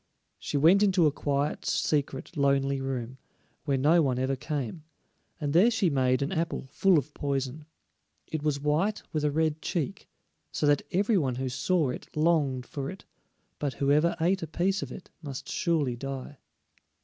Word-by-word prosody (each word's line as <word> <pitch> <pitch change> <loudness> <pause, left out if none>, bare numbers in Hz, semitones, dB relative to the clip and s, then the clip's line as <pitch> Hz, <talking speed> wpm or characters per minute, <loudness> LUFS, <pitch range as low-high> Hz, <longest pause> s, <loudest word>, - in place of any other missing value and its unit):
She 145 - -2
went 170 +8 +6
into 190 -5 +4
a 150 - +4
quiet, 145 0 -1
secret, 145 +1 -1
lonely 140 -1 +2
room, 130 -1 -4 0.5
where 140 -3 +1
no 155 +6 +4
one 130 -4 +1
ever 130 +1 0
came, 145 +1 -4 0.6
and 145 -3 -2
there 185 +8 +6
she 215 -7 +1
made 130 -1 +2
an 140 - -3
apple 165 -2 -2
full 190 +1 +4
of 145 +1 -2
poison. 140 +1 -3 0.6
It 160 - -4
was 150 -2 0
white 155 +9 0
with 155 -2 0
a 150 - +3
red 155 +1 0
cheek, 190 +4 -3 0.4
so - - -1
that 145 -1 +4
every 200 +2 +2
one 130 -5 -1
who 130 +1 -2
saw 140 +3 +1
it - - -7
longed 150 -6 +2
for 140 +1 -5
it; 190 - -10 0.5
but 145 -2 -2
whoever 150 +4 +2
ate 185 +4 +2
a 165 - -4
piece 190 +5 0
of - - -5
it 185 - -10
must 140 -4 -7
surely 150 -8 0
die. 135 +2 -6
145 Hz, 175 wpm, -28 LUFS, 135-165 Hz, 0.6 s, went